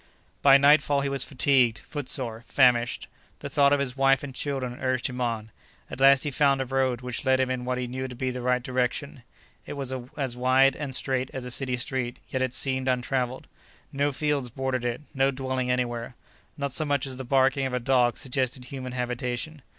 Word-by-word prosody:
By 140 -1 +8
nightfall 145 0 +4
he 140 - -1
was 140 0 +2
fatigued, 130 -4 +2
footsore, 130 -5 -1
famished. 120 -1 +2 0.3
The - - -7
thought 140 -1 +4
of 145 - +3
his 130 -2 -2
wife 135 0 +3
and 140 -2 -6
children 130 -2 -4
urged 130 -2 0
him 125 -1 -3
on. 115 -2 -2 0.4
At - - -6
last 135 0 +6
he 145 - -2
found 140 +1 +3
a 135 - -1
road 130 -1 0
which 125 +2 -4
led 130 -1 +3
him 130 -1 +1
in 125 -1 -3
what 125 0 -1
he 125 - -2
knew 130 +2 -4
to 125 - -9
be 130 +1 -2
the 125 0 -5
right 125 0 +1
direction. 130 +2 -2 0.5
It - - -5
was 135 -2 -4 0.2
as 135 -4 -2
wide 130 +2 +4
and 140 -3 -3
straight 130 -1 0
as 130 -1 -5
a 125 - -6
city 130 0 -1
street, 125 0 -3
yet 130 - -2
it 130 -1 -1
seemed 130 -1 +1
untraveled. 125 0 -1 0.5
No 140 +1 +1
fields 145 -2 -1
bordered 130 0 -2
it, 120 +2 -2
no 135 0 +2
dwelling 130 -1 -2
anywhere. 120 -1 -2 0.4
Not 140 -2 -2
so 155 - +1
much 145 -3 0
as 130 -2 -5
the 130 - -5
barking 135 +1 +2
of 130 - -6
a - - 0
dog 125 -1 +2
suggested 130 -1 -2
human 130 -1 -7
habitation. 125 +4 -3
130 Hz, 205 wpm, -26 LUFS, 125-135 Hz, 0.5 s, By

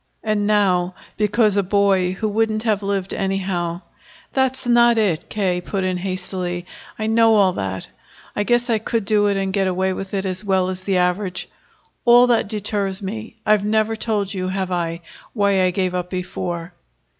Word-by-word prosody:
And 215 -1 0
now, 185 -4 +2 0.2
because 210 0 +2
a - - +5
boy 190 -1 +2
who 215 +3 -2
wouldn't 215 +1 0
have 215 -3 +1
lived 195 -1 -2
anyhow 185 -3 -2 0.2
" - - -25
"That's 265 -1 0
not 240 -1 +5
it," 195 -8 0
K. 185 -4 0
put 195 +1 -3
in 185 -1 0
hastily. 180 -1 -4 0.3
"I 215 - -2
know 225 0 +4
all 195 -3 +4
that. 95 - -4 0.5
I - - 0
guess 240 +3 +2
I 225 -3 +1
could 225 0 -2
do 205 -1 +3
it 200 -1 +1
and 195 -1 -1
get 195 -1 +1
away 185 +1 0
with 195 +1 -5
it 195 0 -1
as 185 +2 -3
well 190 -2 +1
as 185 0 -5
the 190 0 0
average. 180 +1 -1 0.5
All 240 0 +7
that 240 -4 +2
deters 205 -2 -2
me 220 +3 -6
I've 210 -1 +3
never 220 +1 +1
told 215 -3 -1
you, 185 -1 -2
have 190 0 -2
I, 170 -1 -2 0.3
why 200 -3 +2
I 185 - +3
gave 185 0 -1
up 180 0 -3
before?" 180 -2 -4
195 Hz, 185 wpm, -21 LUFS, 185-215 Hz, 0.5 s, All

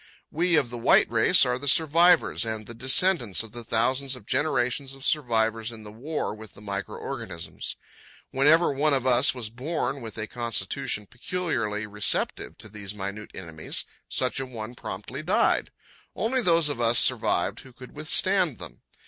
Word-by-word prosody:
We 170 +2 +1
of 135 -6 +2
the 120 - -5
white - - +5
race - - +5
are 125 0 -1
the 145 - -6
survivors 165 +4 +4
and 110 -1 -4
the 115 - -9
descendants 130 - +3
of 110 - -11
the 120 +1 -7
thousands 130 +4 0
of 125 - -13
generations 135 0 0
of 135 0 -8
survivors 115 -5 +1
in 110 -2 -10
the 105 - -10
war 135 +4 -4
with 110 0 -11
the - - -13
micro 100 -1 -5
organisms. 100 -11 -6 0.6
Whenever 150 +4 +4
one 145 +1 +2
of 130 -1 -1
us 130 +2 +4
was 115 -4 -5
born 135 +1 -3
with 115 -1 -7
a 110 - -2
constitution 115 -2 -2
peculiarly 115 - -3
receptive 105 -1 -1
to - - -11
these 105 -1 -8
minute 100 +1 -6
enemies, 80 -4 -3 0.2
such 130 -1 0
a 135 - -4
one 115 -2 -7
promptly - - -7
died. - - +2 0.5
Only 250 +4 0
those 170 -6 +4
of 140 -5 -2
us 115 0 +3
survived - - +2
who - - -14
could - - -13
withstand - - +2
them. - - -11
120 Hz, 170 wpm, -26 LUFS, 110-140 Hz, 0.6 s, white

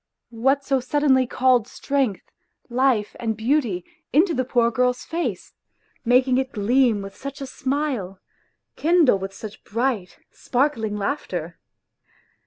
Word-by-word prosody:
What 270 +5 +1
so 270 -1 +2
suddenly 260 0 +2
called 250 -3 +2
strength, 270 -6 -2 0.4
life 245 -4 +1
and 225 -3 -2
beauty 225 - 0 0.3
into 335 +5 +4
the 255 - 0
poor 240 -2 +2
girl's 250 +1 0
face, 290 - -3 0.5
making 255 +1 +3
it 265 0 -3
gleam 225 0 +2
with 195 0 -9
such 275 0 -7
a 275 - -4
smile, 260 -8 -3 0.6
kindle 320 - +4
with 195 0 -5
such 210 +2 -10
bright, 230 -4 -2
sparkling 240 -5 -1
laughter 180 - -3
250 Hz, 125 wpm, -23 LUFS, 215-270 Hz, 0.6 s, into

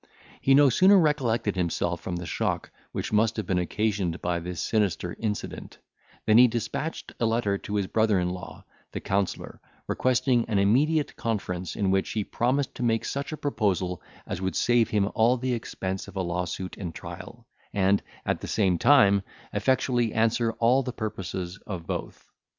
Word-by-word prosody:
He 135 - +5
no 140 -1 +6
sooner 190 - +6
recollected 130 - +1
himself 85 -1 -1
from 90 - -4
the 85 0 -5
shock 80 - -2 0.2
which - - -4
must 110 +2 +2
have 110 - -2
been 90 0 +1
occasioned 95 -2 -1
by 85 0 -1
this 90 0 -6
sinister 95 -5 0
incident, 105 -2 -4 0.5
than 110 +1 +6
he 125 - +9
despatched 120 +7 -4
a 115 - +2
letter 110 -3 +1
to 105 - -5
his 100 -2 +1
brother 110 0 +2
in 90 0 0
law, 90 0 -8 0.3
the - - -3
counsellor, 95 -1 -2 0.2
requesting 125 -1 +2
an 105 - 0
immediate 140 +10 +2
conference, 95 -6 -3
in 100 -2 +1
which 95 0 0
he 110 - 0
promised 130 +6 0
to - - -8
make 115 -1 +1
such 140 +2 -3
a 155 - -4
proposal 95 - -1 0.2
as 85 - -5
would 95 0 -2
save 120 -2 +3
him 105 -2 +2
all 120 +3 +3
the 130 +1 -1
expense 95 -5 -4
of 100 - -12
a 95 - -1
lawsuit 90 +1 -3
and 85 -5 -6
trial, - - -9 0.3
and, 100 0 +2 0.2
at - - -1
the - - -5
same 95 -6 +1
time, 115 -8 +6 0.3
effectually 125 -3 +1
answer 115 +1 +2
all 120 +4 +3
the 125 -1 -4
purposes 95 -4 -5
of 90 -6 -5
both. - - -5
105 Hz, 175 wpm, -26 LUFS, 95-120 Hz, 0.5 s, he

